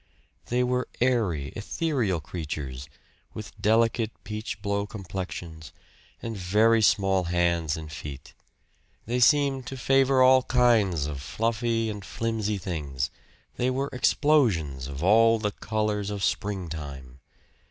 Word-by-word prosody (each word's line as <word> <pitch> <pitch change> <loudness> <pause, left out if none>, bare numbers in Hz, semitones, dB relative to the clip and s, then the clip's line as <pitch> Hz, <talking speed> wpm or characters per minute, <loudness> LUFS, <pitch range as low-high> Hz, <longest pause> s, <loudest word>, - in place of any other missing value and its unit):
They 125 +1 +1
were 125 0 0
airy, 105 - +1
ethereal 115 - -1
creatures, 70 -4 -6 0.5
with 110 -1 -8
delicate 115 +1 +2
peach 110 0 -5
blow 100 0 -1
complexions, 90 -6 -7 0.5
and 115 -1 -4
very 105 +5 +3
small 95 -3 +3
hands 85 -2 +1
and 80 -1 -8
feet. 75 -2 -8 0.7
They 120 +3 -1
seemed 135 0 +3
to 135 - -6
favor 135 0 +3
all 130 0 +6
kinds 115 - +2
of 70 -3 -5
fluffy 115 - -1
and 105 -2 -5
flimsy 110 -1 -2
things; 75 -8 -3 0.5
they 125 - +1
were 135 +2 -2
explosions 110 - +2
of 70 +2 -6
all 115 +4 +5
the 105 -1 -2
colors 105 -1 -2
of 100 -1 -4
the - - +2
springtime. 75 -10 -4
105 Hz, 125 wpm, -26 LUFS, 80-115 Hz, 0.7 s, all